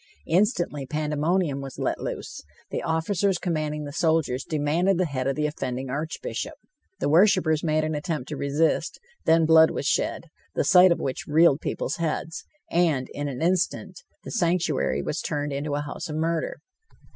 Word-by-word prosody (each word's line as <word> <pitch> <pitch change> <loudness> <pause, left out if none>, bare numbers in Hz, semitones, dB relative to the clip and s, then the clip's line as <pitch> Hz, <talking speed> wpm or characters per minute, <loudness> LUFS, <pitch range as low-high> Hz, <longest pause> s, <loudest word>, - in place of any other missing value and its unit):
Instantly 175 - +1
pandemonium 150 +1 0
was 135 -1 -8
let - - -1
loose. - - -5 0.3
The - - -2
officers 180 +4 0
commanding 155 -4 -2
the 145 - -6
soldiers 160 -5 +1
demanded 160 +5 +1
the 185 - +2
head 135 -4 -2
of 135 - 0
the 150 - 0
offending 130 -3 -3
Archbishop. 155 +4 -4 0.4
The - - 0
worshipers 160 -1 +4
made 155 -1 +1
an 155 0 -1
attempt 150 -3 -3
to - - -4
resist; 145 +3 0 0.3
then 165 0 +4
blood 160 0 +7
was - - -4
shed, - - 0 0.3
the - - +2
sight 180 0 +7
of 170 - +1
which 130 - -4
reeled 155 -1 +4
people's - - -3
heads, 165 -1 -3 0.3
and, 160 -7 +1
in 145 0 -3
an 135 +1 -4
instant, 185 - 0 0.2
the - - -8
sanctuary 175 - 0
was - - -2
turned 145 -1 -2
into 145 +1 -2
a 145 - -1
house 145 +2 -6
of 150 - -4
murder. 165 +1 -1
155 Hz, 170 wpm, -25 LUFS, 145-170 Hz, 0.4 s, blood